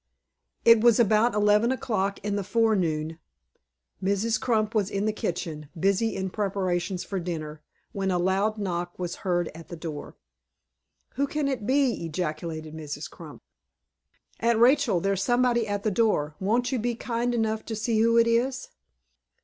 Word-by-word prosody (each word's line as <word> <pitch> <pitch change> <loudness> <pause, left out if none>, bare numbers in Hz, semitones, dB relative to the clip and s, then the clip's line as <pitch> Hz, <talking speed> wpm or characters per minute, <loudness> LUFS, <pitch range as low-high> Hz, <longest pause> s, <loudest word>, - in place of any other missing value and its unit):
IT 230 -1 +7
was 235 -1 +5
about 220 +1 +3
eleven 210 +3 +3
o'clock 215 -7 -1
in 205 -1 -1
the 200 - -1
forenoon, 180 -8 0 0.8
Mrs. 205 +3 +1
Crump 220 -3 +1
was 210 -3 +1
in 200 0 -2
the 215 - +1
kitchen, 160 -6 -4
busy 200 +5 +1
in 190 -1 -3
preparations 185 -3 -1
for 195 - -3
dinner, 155 -3 -5 0.3
when 195 -1 -2
a 180 - +1
loud 195 +4 +1
knock 175 -3 -3
was 175 -1 -4
heard 175 -4 -1
at 165 0 -11
the 170 - -7
door. 160 -3 -7 1.0
"Who 280 +1 +1
can 295 0 -1
it 250 -6 -3
be?" 265 -6 +2
ejaculated 155 -1 -4
Mrs. 155 -2 -6
Crump. - - -12 1.0
"Aunt 235 0 +2
Rachel, 240 - +4
there's 195 0 0
somebody 240 0 +2
at 205 -1 -2
the 215 - +1
door; 185 -9 +1
won't 230 +7 +1
you 260 - 0
be 240 +1 -1
kind 240 +1 -2
enough 220 -1 0
to 225 - -3
see 220 +1 0
who 230 +1 +4
it 230 - +6
is?" 245 +3 0
205 Hz, 160 wpm, -26 LUFS, 175-230 Hz, 1.0 s, IT